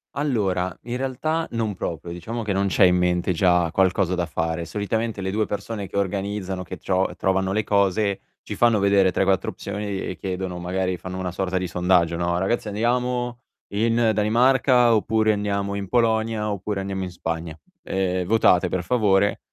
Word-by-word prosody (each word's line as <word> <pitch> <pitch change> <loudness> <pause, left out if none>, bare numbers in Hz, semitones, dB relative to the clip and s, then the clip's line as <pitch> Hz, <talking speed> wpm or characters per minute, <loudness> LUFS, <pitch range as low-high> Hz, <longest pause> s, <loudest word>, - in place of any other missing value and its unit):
Allora, 95 - -1
in 120 +1 -4
realtà 155 +5 -2
non 115 -3 -1
proprio, 85 -1 -5
diciamo 110 +7 -5
che 105 - -2
non 100 +1 +1
c'è 95 - +3
in 90 -1 +5
mente 90 0 +1
già 90 -1 +2
qualcosa 95 0 +2
da 90 -1 0
fare. 80 +1 -2
Solitamente 105 +4 -2
le 95 0 -2
2 105 +1 0
persone 105 -1 -4
che 95 - -12
organizzano, 95 -1 -2
che - - -7
tro 95 -1 -1
trovano 95 +1 0
le 110 0 +1
cose 100 0 +1 0.2
ci - - -6
fanno 115 -3 +3
vedere 100 -1 +4
3-4 95 -1 +1
opzioni 105 0 -5 0.2
e 90 - -5
chiedono 95 -2 -4
magari, 90 +1 -2
fanno 95 +2 -7
una 90 -1 -3
sorta 95 0 -2
di 90 - -1
sondaggio, 90 -1 +2
no: 85 0 0
"Ragazzi 105 +4 -1
andiamo 120 +3 -1 0.3
in 115 +2 +2
Danimarca, 120 +3 +4
oppure 110 +1 +2
andiamo 100 -1 -1
in 100 -1 -4
Polonia, 110 -1 +1
oppure 100 0 -3
andiamo 95 -1 -3
in 90 - -5
Spagna, 80 -2 -5 0.3
ehm, 95 -1 -1
votate 95 -3 +4
per 90 0 -2
favore." 100 -3 +2
95 Hz, 170 wpm, -23 LUFS, 90-110 Hz, 0.3 s, in